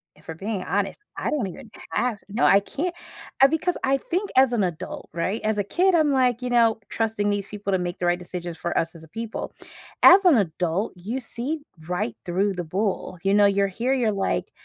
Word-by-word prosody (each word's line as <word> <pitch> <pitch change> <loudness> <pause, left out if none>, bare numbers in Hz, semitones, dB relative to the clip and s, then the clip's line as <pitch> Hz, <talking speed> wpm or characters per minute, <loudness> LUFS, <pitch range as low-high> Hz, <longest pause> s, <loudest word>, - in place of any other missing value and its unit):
If 150 - -22
we're 160 - -4
being 195 +2 -3
honest, 200 +1 -1 0.2
I - - -2
don't 290 -8 0
even 230 +6 -10 0.2
have 240 -4 0
no, 215 +4 -1
I 195 - +7
can't, 320 - -3 0.5
uh, 270 - +9
because 320 +4 0
I 270 +1 +3
think 365 +9 -2
as 260 -1 +5
an 230 -4 +1
adult, 175 -4 -5
right, 185 +6 -2
as 215 0 0
a - - +2
kid, 365 - +2
I'm, 315 -3 +4
like, 255 -3 +2
you 250 - -3
know, 230 -2 +3
trusting 220 -2 -1
these 205 -1 -1
people 205 -1 -4
to 190 - +3
make 175 -1 -4
the 180 - -1
right 175 0 +2
decisions 175 -1 -7
for 170 - -3
us 165 +1 -1
as 160 - -12
a - - -13
people. 225 +7 -6 0.5
As 385 +2 +9
an 335 -8 +7
adult, 180 +1 -1
you 210 +9 -4
see 265 +6 -4 0.3
right 180 -9 -2
through 195 +3 0
the 180 -1 -4
bull, 185 +1 -2
you 195 0 +2
know, 205 0 +6
you're 200 0 +3
here, 235 +7 -1
you're, 235 -5 +2
like, 195 -1 -1
205 Hz, 220 wpm, -24 LUFS, 180-250 Hz, 0.5 s, uh